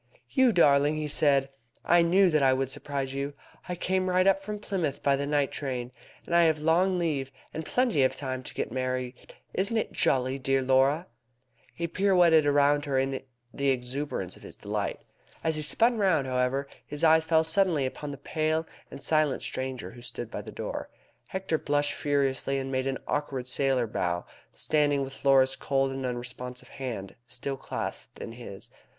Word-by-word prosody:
"You 260 -3 +4
darling!" 145 -5 +4
he 155 0 -2
said; 140 -2 +3 0.4
"I 175 0 +5
knew 180 +2 +4
that 155 -1 +3
I 135 -1 +5
would 135 0 0
surprise 135 -2 -4
you. 140 +1 -3 0.3
I 180 - -1
came 185 +1 0
right 185 0 +3
up 195 0 +4
from 210 +2 -5
Plymouth 180 -9 -3
by 140 -1 +4
the 140 +1 -2
night 145 -2 +1
train. 125 -3 -4 0.3
And - - -5
I 170 - +7
have 160 -1 +3
long 175 +5 +2
leave, 145 -6 -1 0.2
and 160 - -4
plenty 240 - +1
of 130 - +3
time 130 -2 -4
to - - -9
get - - -3
married. 130 0 -2 0.4
Isn't 200 +5 0
it 220 - -1
jolly, 130 +1 +1
dear 135 0 +1
Laura?" 135 +5 +3 0.7
He 170 - -2
pirouetted 175 -4 +4
round 145 0 +4
with 145 - -8
her 140 -2 0
in 135 0 0 0.3
the 140 0 0
exuberance 125 -6 -2
of - - -16
his - - -10
delight. - - -3 0.4
As 160 -1 +2
he 155 - -1
spun 230 +10 +2
round, 175 -9 +3
however, 130 +2 0 0.2
his 150 +2 -6
eyes 160 0 +6
fell 160 0 +3
suddenly 160 -3 +2
upon 145 +3 -5
the 140 - -6
pale 155 +2 -1 0.2
and 140 - -8
silent 155 -3 +1
stranger 130 -1 -4
who 120 +1 -13
stood 120 -1 -7
by - - -4
the - - -9
door. - - -5 0.4
Hector 190 -4 -2
blushed 145 0 +1
furiously, 140 -1 0
and 135 0 -3
made 130 0 0
an 135 -1 -1
awkward 140 -4 -2
sailor 130 -1 +2
bow, 90 -5 -2 0.3
standing 145 -2 +1
with 135 0 -9
Laura's 135 -1 +5
cold 135 -1 0
and 135 -1 -3
unresponsive 125 +1 -6
hand 120 -8 -6
still 135 +3 -4
clasped - - -5
in - - -7
his. 115 -5 -10
140 Hz, 185 wpm, -28 LUFS, 130-160 Hz, 0.7 s, I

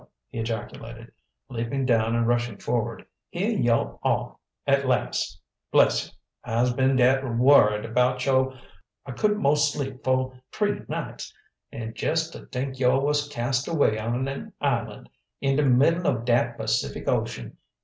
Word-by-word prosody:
he - - -6
ejaculated, 115 0 -6 0.4
leaping 130 +2 -2
down 115 -2 +2
and 115 0 +1
rushing 120 -2 0
forward. 115 0 -2 0.2
"Heah 205 +6 -1
yo' 115 -1 +1
are - - 0 0.3
at 140 -1 +2
las', 125 -1 -1 0.3
bless - - +4
you! - - -20 0.3
I'se 120 +2 +1
been 130 +1 +2
dat 130 +1 +4
worried 115 -4 +4
'bout 125 +1 +2
yo' 130 -1 +2 0.5
I 135 - -6
couldn't 210 +9 0
'most 145 +1 +3
sleep 135 -3 -5
fo' 130 0 +1 0.2
t'ree 210 -1 -1
nights. - - -5 0.4
An' 115 -1 -6
jess 160 +5 -1
to - - -11
t'ink 130 +1 -4
yo' 130 0 +3
was 145 +1 +1
cast 125 -1 -1
away 145 -10 +2
on 120 +4 -2
an 135 0 -6
island - - -2 0.3
in 135 0 +1
de 150 - +3
middle 145 +7 +3
of 115 -2 0
dat 120 0 +2
Pacific - - -2
Ocean! - - -2
130 Hz, 150 wpm, -25 LUFS, 120-140 Hz, 0.5 s, bless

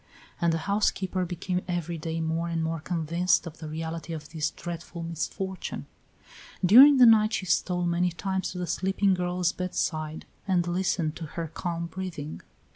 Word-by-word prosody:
And 170 -1 +3
the 165 - +1
housekeeper 195 -2 0
became 180 +1 -2
every 175 -2 -2
day 165 +1 -3
more 165 +1 -1
and 165 -1 -1
more 165 0 -2
convinced 170 +2 +1
of 160 -2 -9
the 155 - -6
reality 165 +1 -5
of 155 -2 -7
this 160 -1 -1
dreadful 170 0 -7
misfortune. 180 +3 -4 0.8
During 265 +9 +9
the 250 - +8
night 220 -1 +6
she 195 - -1
stole 180 0 +1
many 175 +1 +2
times 190 +1 -2
to - - -7
the 180 - -2
sleeping 190 +2 +1
girl's 180 -1 0
bedside 160 -4 -3 0.2
and 180 -3 +2
listened 175 -3 0
to 165 - -5
her 165 -2 -2
calm 170 -1 -3
breathing. 170 -4 -6
175 Hz, 165 wpm, -27 LUFS, 165-185 Hz, 0.8 s, During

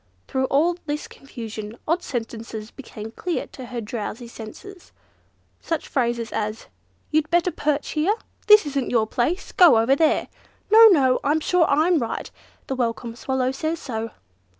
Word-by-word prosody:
Through 265 0 0
all 325 +6 +2
this 295 +1 -3
confusion, 225 -4 -8
odd 335 +3 +1
sentences 225 -4 -5
became 225 -5 -9
clear 350 +8 -3
to 260 - -9
her 245 0 -5
drowsy 230 +1 -5
senses. 290 - -11 0.7
Such 330 -2 -3
phrases 235 -3 -1
as, 215 0 -3 0.5
"You'd 310 0 +1
better 345 +1 +2
perch 295 -2 -1
here?" 325 +7 +1 0.3
"This 420 -4 +8
isn't 275 -3 -2
your 230 -3 +2
place!" 255 - -1
"Go 345 - +7
over 230 +5 +4
there!" 315 +1 +2 0.4
"No! 450 +1 +10
no! 270 -10 +4
I'm 300 +3 +2
sure 345 +2 +3
I'm 315 +4 +3
right! 230 -3 -4 0.3
the - - -3
Welcome 235 -2 -2
Swallow 260 +1 -1
says 315 +4 -2
so." 225 -6 -4
265 Hz, 150 wpm, -23 LUFS, 230-320 Hz, 0.7 s, No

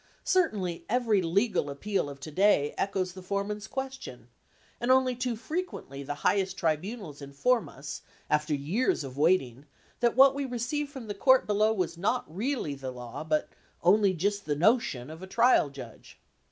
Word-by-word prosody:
Certainly 205 - +1
every 225 -4 +2
legal 185 -1 +1
appeal 170 +3 -2
of 140 -1 -9
to 155 - -7
day 165 -4 +3
echoes 190 -2 -1
the 185 - -9
fore 200 +2 -1
man's 210 0 -5
question, 265 - -6 0.5
and 240 - -2
only 260 -1 +4
too 245 -1 -2
frequently 260 - -5
the 145 +1 -4
high 200 - +4
est 190 0 -3
tribunals 170 - -2
inform 140 - 0
us, 140 +1 -8 0.3
after 150 0 +1
years 165 - 0
of 130 -2 -8
waiting, 145 -4 +1 0.3
that 240 -1 +2
what 270 +1 +7
we 280 +1 -2
received 265 +4 -2
from 265 -5 -8
the 210 - -4
court 260 +6 +4
below 210 +1 +2
was 180 -5 -2
not 230 +7 0
really 235 - -1
the 135 -1 -6
law, 125 +1 -7
but 155 -1 0 0.4
"on'y 195 +1 +4
jist 200 +4 -1
the 150 - 0
notion" 155 - +1
of 160 +2 -10
a 190 - -8
trial 230 - +4
judge. 130 -5 -11
195 Hz, 175 wpm, -28 LUFS, 150-240 Hz, 0.5 s, what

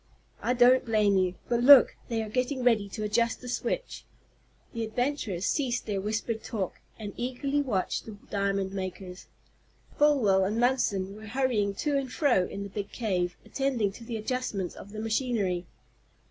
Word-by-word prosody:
"I 245 - +1
don't 250 +1 +6
blame 215 -4 +2
you. 185 -1 +1
But 235 0 +1
look, 270 +1 +8
they 225 -2 -1
are - - -6
getting 250 +4 -1
ready 220 -5 +3
to 215 - -5
adjust 230 +2 +1
the 250 - -10
switch." - - -3 0.7
The 230 -1 -2
adventurers 220 -5 -2
ceased 255 -5 0
their 200 -3 -2
whispered 220 +2 -2
talk, 200 -6 -4 0.2
and 205 -2 -6
eagerly 275 +4 -1
watched 215 -9 -2
the 215 -2 -8
diamond 195 -1 0
makers. 185 -1 -6 0.7
Folwell 245 -11 +4
and 210 +4 0
Munson 205 -6 +1
were 215 +1 -10
hurrying 220 -4 0
to 290 +6 0
and 265 -2 -3
fro 250 - +2
in 200 - -6
the 200 - -7
big 200 0 -5
cave, 180 -6 -1
attending 260 -7 0
to 230 - -12
the 230 -1 -4
adjustments 215 -5 -3
of 200 - -11
the 215 - -7
machinery. 215 -6 -1
220 Hz, 165 wpm, -28 LUFS, 200-250 Hz, 0.7 s, look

